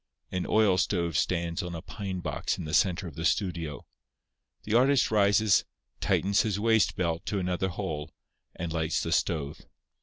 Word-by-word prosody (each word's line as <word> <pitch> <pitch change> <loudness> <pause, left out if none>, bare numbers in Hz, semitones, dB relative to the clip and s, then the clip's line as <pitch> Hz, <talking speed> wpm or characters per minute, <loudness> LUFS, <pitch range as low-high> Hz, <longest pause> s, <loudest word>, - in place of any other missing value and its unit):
An 90 -1 -2
oil 105 -4 +3
stove 85 -4 0
stands 85 +1 0
on 90 -2 -5
a 80 - -6
pine 95 -4 -5
box - - -2
in - - -5
the 75 - -6
centre 90 +2 +2
of 80 - -9
the 80 - -6
studio. 85 -3 -1 0.8
The 105 - -3
artist 130 +1 +4
rises, 100 0 +4 0.4
tightens 100 +1 +2
his 105 -4 -1
waist 110 0 +3
belt 85 -2 -1
to 105 - -1
another 90 0 -1
hole, 80 -3 -4 0.5
and 85 -2 -4
lights 80 -1 0
the - - -3
stove. 75 -4 -1
90 Hz, 170 wpm, -28 LUFS, 85-100 Hz, 0.8 s, artist